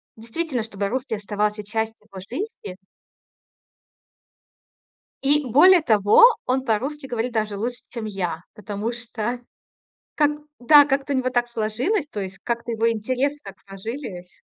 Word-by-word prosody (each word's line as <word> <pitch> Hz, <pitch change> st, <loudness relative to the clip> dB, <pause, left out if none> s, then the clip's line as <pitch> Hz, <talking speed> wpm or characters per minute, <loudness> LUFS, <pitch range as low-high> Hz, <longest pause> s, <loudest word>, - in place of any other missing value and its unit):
действительно, 240 Hz, +2 st, -3 dB
чтобы 200 Hz, -3 st, -3 dB
русский 250 Hz, 0 st, -2 dB
оставался 210 Hz, +1 st, -2 dB
частью 220 Hz, 0 st, -4 dB
его 190 Hz, -1 st, -8 dB
жизни. 255 Hz, -, -6 dB, 2.5 s
И 290 Hz, +1 st, +3 dB
более 335 Hz, +9 st, +6 dB
того, 210 Hz, -, +5 dB, 0.2 s
он 260 Hz, +1 st, 0 dB
по-русски 270 Hz, +6 st, -1 dB
говорит 240 Hz, -1 st, -2 dB
даже 215 Hz, -2 st, -1 dB
лучше, 240 Hz, +4 st, -4 dB
чем 230 Hz, -3 st, -6 dB
я, 180 Hz, -5 st, -3 dB
потому 210 Hz, +2 st, -4 dB
что 240 Hz, 0 st, -4 dB, 0.8 s
как, 295 Hz, -1 st, +3 dB, 0.3 s
да, 290 Hz, +3 st, +7 dB
как-то 280 Hz, 0 st, 0 dB
у -, -, +1 dB
него 255 Hz, 0 st, 0 dB
так 245 Hz, -1 st, 0 dB
сложилось. 240 Hz, -, -1 dB
То 210 Hz, -, -5 dB
есть 190 Hz, 0 st, -7 dB
как-то 235 Hz, 0 st, -3 dB
его 230 Hz, +1 st, +2 dB
интерес 255 Hz, +6 st, -1 dB
так 195 Hz, -1 st, -10 dB
сложились. 195 Hz, -2 st, -7 dB
230 Hz, 135 wpm, -23 LUFS, 210-265 Hz, 2.5 s, да